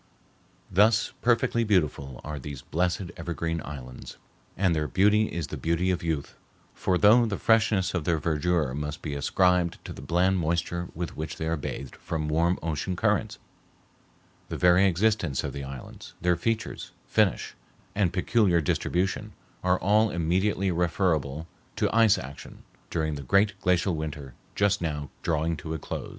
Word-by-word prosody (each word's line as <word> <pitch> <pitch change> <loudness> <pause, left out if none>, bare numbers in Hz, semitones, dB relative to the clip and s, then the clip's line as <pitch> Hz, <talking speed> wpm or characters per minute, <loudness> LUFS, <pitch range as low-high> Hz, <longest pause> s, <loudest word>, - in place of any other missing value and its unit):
Thus 105 +4 +3
perfectly 115 0 +2
beautiful 75 - 0
are 75 -1 -5
these 70 -1 -8
blessed 90 +2 -1
evergreen 85 -1 -3
islands, 65 -4 -9 0.4
and 95 -2 +2
their 75 -1 0
beauty 105 +4 +3
is 85 -2 -3
the - - -2
beauty 85 +3 0
of 90 -1 -1
youth, 80 -5 -3 0.4
for 90 -1 0
though 115 +5 +6
the 100 - -2
freshness 110 -4 +2
of 90 -4 -1
their 85 +1 +1
verdure 80 -2 0
must 75 +1 -5
be 75 - -3
ascribed 90 +4 +2
to - - -6
the - - -10
bland 90 +2 +2
moisture 85 +1 -1
with 85 0 -4
which 80 0 -5
they 80 - -3
are 80 +1 0
bathed 70 -3 -6
from 75 -2 -3
warm 85 +3 +2
ocean 80 +3 -2
currents, 105 +1 0 1.1
the - - -4
very 90 +2 +5
existence 95 -5 +1
of - - -4
the 70 - -5
islands, 70 -1 -9
their 90 +1 +2
features, 115 +4 -3
finish, - - +1 0.4
and 100 -4 +1
peculiar 90 0 +2
distribution, 90 +4 -1 0.3
are 90 0 +2
all 105 +3 +4
immediately 95 +3 0
referable 80 -3 0 0.3
to - - 0
ice 115 -3 +5
action 70 +2 -9 0.3
during 80 -2 -1
the 70 - -5
great 100 - +3
glacial 90 0 +2
winter 75 -4 -5 0.2
just 100 -1 +2
now 75 -4 -3
drawing 80 0 0
to 80 +1 -5
a - - -2
close. - - -6
85 Hz, 160 wpm, -27 LUFS, 75-95 Hz, 1.1 s, though